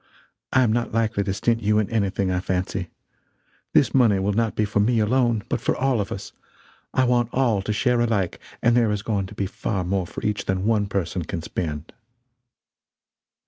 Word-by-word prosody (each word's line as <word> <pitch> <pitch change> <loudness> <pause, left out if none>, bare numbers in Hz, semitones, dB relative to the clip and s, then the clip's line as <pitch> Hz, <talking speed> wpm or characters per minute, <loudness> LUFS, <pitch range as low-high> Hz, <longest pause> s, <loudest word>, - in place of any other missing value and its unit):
I 130 - +4
am 110 -3 +2
not 120 0 -1
likely 110 -2 0
to 95 - -1
stint 115 +4 0
you 105 0 +2
in 105 -2 +2
anything, 100 -3 0
I 90 - 0
fancy. 90 -1 -2 0.8
This - - +4
money 115 -7 +4
will 100 +2 0
not 115 +1 0
be 110 - +1
for 105 0 -1
me, 115 +4 +3
alone, 115 0 +2
but - - -2
for - - 0
all 130 -4 +1
of 100 - -5
us. 95 - -6 0.6
I 130 - +2
want 120 -2 +2
all 120 -6 +2
to 100 - -3
share 120 +3 +1
alike; 105 -6 0 0.2
and 120 0 +4
there 120 -2 +3
is 105 -1 -2
going 100 -4 -1
to - - -12
be 100 - -1
far 95 0 -3
more 90 0 -1
for - - -7
each 105 -1 -1
than 95 +1 -1
one 105 -2 +2
person 95 -2 -2
can 85 0 -5
spend. 75 -3 -4
105 Hz, 200 wpm, -23 LUFS, 95-115 Hz, 0.8 s, I